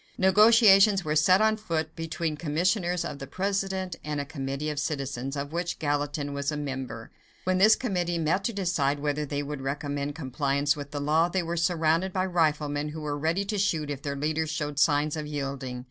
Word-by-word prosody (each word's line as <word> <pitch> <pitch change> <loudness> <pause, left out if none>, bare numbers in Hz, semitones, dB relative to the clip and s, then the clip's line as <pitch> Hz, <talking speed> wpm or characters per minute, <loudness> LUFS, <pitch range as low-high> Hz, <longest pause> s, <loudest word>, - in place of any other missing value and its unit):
Negotiations 200 -1 +6
were 150 0 0
set 185 +7 +5
on 220 0 +3
foot 160 -7 -3
between 165 -1 -3
commissioners 175 +3 0
of 145 - -6
the 135 - -7
President, 190 -1 -2
and 150 -1 -3
a 145 - -2
committee 140 +2 -4
of 145 - -3
citizens, 135 -2 -3
of 140 +2 -5
which 175 0 -2
Gallatin 145 -1 -2
was 140 +1 -2
a 150 - -3
member. 135 -5 -5 0.3
When 185 0 +1
this 215 +3 +7
committee 180 -8 -1
met 165 +4 0
to - - +1
decide 165 -8 0
whether 150 0 -1
they 145 0 -2
would 145 -1 -5
recommend 145 +1 -3
compliance 140 0 0
with 145 -1 -7
the 145 - -4
law, 155 +4 +2
they 185 0 -1
were 170 +1 -3
surrounded 170 +1 +1
by 185 - +1
riflemen 150 -4 0
who 155 +1 -7
were 150 -1 -2
ready 165 +7 0
to 205 0 -2
shoot 160 -7 0
if 140 -1 -5
their 140 -1 -3
leaders 155 +2 -1
showed 150 -1 -3
signs 145 0 +3
of 155 -1 -4
yielding. 135 -3 -4
155 Hz, 195 wpm, -27 LUFS, 145-180 Hz, 0.3 s, this